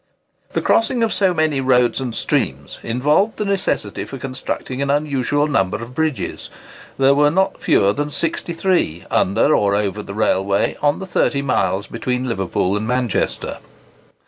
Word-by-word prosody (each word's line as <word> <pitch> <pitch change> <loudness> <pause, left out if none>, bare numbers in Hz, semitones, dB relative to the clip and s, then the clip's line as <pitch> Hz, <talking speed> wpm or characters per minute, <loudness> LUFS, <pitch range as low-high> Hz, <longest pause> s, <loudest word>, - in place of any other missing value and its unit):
The - - -1
crossing 230 +1 +2
of 225 - +1
so 190 -2 +2
many 155 -5 +1
roads 125 -1 +2
and 125 -3 -4
streams 70 +1 -2
involved 150 - +1
the 210 - -2
necessity 195 - -1
for 135 - -8
constructing 130 0 -5
an 140 - -1
unusual 145 0 +1
number 95 -11 +1
of 115 +2 -9
bridges. 155 -1 -2 0.5
There 135 +1 +5
were 145 +1 +4
not 190 +5 0
fewer 100 0 +3
than 145 +3 -2
63, 165 - -1
under 110 +10 +3
or 100 -1 +2
over 105 0 -1
the 100 -1 -8
railway, 100 -2 +1
on 145 0 +2
the 190 - -6
30 140 -6 0
miles 100 -7 0
between 125 +2 -3
Liverpool 95 -3 -1
and 105 +1 -2
Manchester. 125 -3 -1
130 Hz, 155 wpm, -19 LUFS, 105-150 Hz, 0.5 s, There